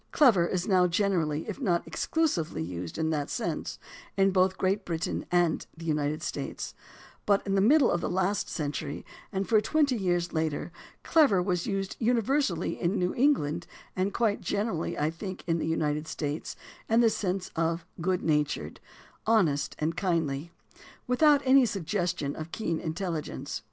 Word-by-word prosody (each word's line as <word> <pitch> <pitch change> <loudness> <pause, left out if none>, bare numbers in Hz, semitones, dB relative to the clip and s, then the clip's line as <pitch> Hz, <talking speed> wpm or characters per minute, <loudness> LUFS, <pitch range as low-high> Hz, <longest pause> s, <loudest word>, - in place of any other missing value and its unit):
"Clever" 225 - +5
is 180 0 -2
now 185 -3 +4
gener 190 0 +2
ally, 150 0 -2
if - - -5
not 175 -8 +1
exclusively, 235 - -1
used 85 0 -6
in 160 0 0
that 145 -2 -1
sense - - -3 0.4
in 195 0 +4
both 185 0 +2
Great 195 +2 +1
Britain 165 -3 -3
and 175 -2 +1
the 165 - -9
United 150 -1 -1
States; - - -4 0.5
but 200 -1 +3
in 195 - -1
the 195 - +3
middle 280 +8 +5
of 175 - 0
the - - -2
last 190 +3 0
century 145 -2 -4 0.3
and 195 -1 -2
for 215 -2 +4
twenty 285 +3 +2
years 175 -4 0
later 160 0 -1 0.3
"clever" 290 - +4
was 180 -1 -1
used 195 -2 -2
universally 235 - +1
in 185 +4 +1
New 180 0 0
England, 175 - +1 0.3
and 185 +2 0
quite 215 -1 0
generally, 205 -5 -2
I 150 +2 +1
think, 185 +3 -7
in 165 -1 0
the - - -2
United 150 -1 0
States, 150 0 -4 0.3
in 225 +1 +5
the 230 - +5
sense 190 -2 -2
of 165 +1 0 0.2
"good 185 +1 0
natured," 150 -2 0 0.5
"honest 180 -11 +2
and 155 +2 -1
kindly," 165 -5 -1 0.6
without 285 +3 +4
any 265 +1 +7
sugges 190 -5 -1
tion 140 -2 -3
of 160 +1 -7
keen 165 -7 -2
intelligence. 165 -1 -4
180 Hz, 165 wpm, -28 LUFS, 160-205 Hz, 0.6 s, any